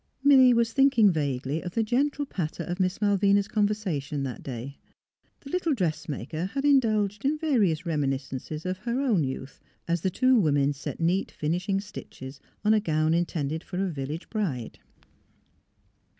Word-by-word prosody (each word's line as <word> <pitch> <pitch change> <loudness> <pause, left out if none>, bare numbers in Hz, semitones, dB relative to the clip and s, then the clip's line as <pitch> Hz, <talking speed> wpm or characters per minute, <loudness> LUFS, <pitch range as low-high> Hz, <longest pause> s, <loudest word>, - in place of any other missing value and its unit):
Milly 265 -3 +7
was 230 -1 +2
thinking 270 -7 +5
vaguely 145 -1 -2
of 180 -1 -7
the 225 - +2
gentle 280 +6 0
patter 170 - -4
of 175 +3 -4
Miss 185 0 0
Malvina's 200 -1 +3
conversation 195 -11 -1
that 130 -3 -5
day. 130 +2 -7 0.6
The 275 - -10
little 340 -5 +1
dressmaker 155 - -3
had 275 +8 -3
indulged 215 -7 +2
in 290 +3 +1
va 310 -1 -1
rious 180 -4 +1
reminiscences 140 0 -3
of 185 0 -2
her 235 +4 -2
own 230 - +2
youth, 130 0 -5 0.3
as 170 -1 0
the 190 - +1
two 255 +5 +3
women 145 -5 +2
set 140 -1 -7
neat 175 +4 +1
finishing 180 +6 -1
stitches 135 -8 -9 0.3
on 215 - +5
a 215 - +4
gown 155 -5 +1
in 170 +1 +2
tended 155 +1 -3
for 180 - -7
a 190 -1 0
\dllage 145 +3 -5
bride. 165 - -3
185 Hz, 165 wpm, -27 LUFS, 150-220 Hz, 0.6 s, Milly